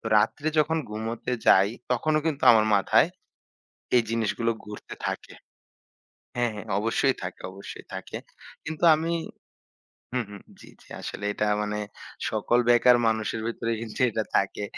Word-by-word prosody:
তো - - -9
রাত্রে 130 +8 0
যখন 155 +2 +3
ঘুমোতে 110 +3 -4
যাই 95 +2 +6 0.2
তখনও 155 +5 +1
কিন্তু 155 -4 -1
আমার 110 -1 +4
মাথায় 110 - +4 0.9
এই 120 - +5
জিনিসগুলো 115 0 0
ঘুরতে 105 0 -9
থাকে। - - -5 1.0
হ্যাঁ, 120 -1 +1
হ্যাঁ 105 - -8
অবশ্যই 115 +5 +1
থাকে। 95 -1 -6
অবশ্যই 100 +1 -10
থাকে। - - -6 0.5
কিন্তু 160 +2 -3
আমি 165 +2 -1 1.0
হুম, 125 -2 0
হুম। 100 -1 -10 0.2
জ্বি, - - -14
জ্বি। - - -21
আসলে 100 - -6
এটা 105 - -1 0.2
মানে 105 0 -2 0.5
সকল 120 - +1
বেকার 120 +1 +6
মানুষের 110 0 0
ভেতরেই 115 0 -2
কিন্তু 110 -2 -7
এটা 110 0 -1
থাকে। 100 +1 0
115 Hz, 140 wpm, -26 LUFS, 105-125 Hz, 1.0 s, যাই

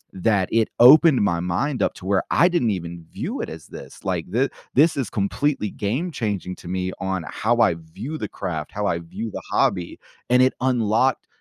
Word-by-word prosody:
that 95 0 +1
it 115 -1 +2
opened 145 +3 +8
my 85 -4 +1
mind 105 - -1
up - - +1
to 90 - -12
where 95 0 +2
I 175 - +5
didn't 170 -10 +1
even 85 -3 -5
view - - -4
it - - -4
as - - -10
this. - - -11
Like, 90 -3 -2
thi 130 +6 +1 0.3
this 155 +5 +5
is 130 -7 -2
completely 105 +3 -1
game-changing 105 - -3
to - - -12
me 95 +1 -2
on 95 -2 -2
how 120 +2 0
I 90 -5 +4
view 95 - -7
the - - -3
craft, 80 -4 -5
how 105 0 -2
I 85 - 0
view 95 +7 -6
the - - -6
hobby, 85 -1 0 0.3
and 125 +1 +5
it 130 - +3
unlocked 125 0 +1
105 Hz, 195 wpm, -23 LUFS, 90-130 Hz, 0.3 s, opened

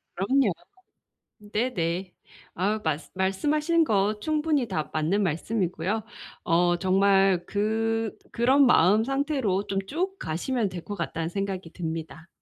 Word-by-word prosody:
그럼요. 225 +4 +2 0.9
네네. 195 -5 -2 0.4
아우 205 +4 0
말씀 160 0 -2
말씀하시는 300 - +1
거 210 -4 +1
충분히 305 -1 0
다 155 -6 -3
맞는 160 +7 +1
말씀이고요. 190 +3 -1 0.4
어 175 0 +3
정말 195 0 +3
그 225 +1 -1 0.2
'그런 260 +4 +4
마음 210 -1 +5
상태로 270 -7 0
좀 195 - -2
쭉 370 - -3
가시면 210 +8 -1
될 180 -3 -8
것 205 - -5
같다.'는 165 -2 -3
생각이 190 -2 -4
듭니다. 165 -1 -6
200 Hz, 255 characters per minute, -26 LUFS, 175-235 Hz, 0.9 s, 마음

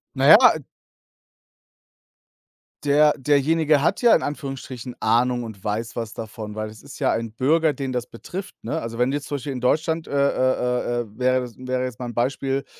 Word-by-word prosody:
Na - - +1
ja - - +11 2.5
der 150 +1 +5
derjenige 150 +2 +2
hat 175 +6 +1
ja 240 -2 +6
in - - 0
Anführungsstrichen 135 -4 -6
Ahnung 120 +2 +2
und 110 -4 -9
weiß 110 +3 -3
was 115 -2 -4
davon, 110 -1 -7
weil 110 0 -4
es 110 +1 -14
ist - - -11
ja - - +2
ein 115 -1 -3
Bürger, 155 +8 +2
den 135 -3 -4
das 125 -1 -3
betrifft, 180 +11 -8
ne? 160 - -2
Also 115 0 -6
wenn 125 +1 +2
du - - -1
jetzt 145 -1 -4
zum 145 - -3
Beispiel 140 0 -4
in 125 - -6
Deutschland, 160 +5 0
äh, - - -10
äh, 125 -3 +1
äh - - -6
wäre 130 0 +2
das 125 -2 -8
wäre 130 0 -2
jetzt 125 -1 -7
mal 125 - -4
'n - - -7
Beispiel 135 +2 -1
130 Hz, 190 wpm, -23 LUFS, 120-145 Hz, 2.5 s, ja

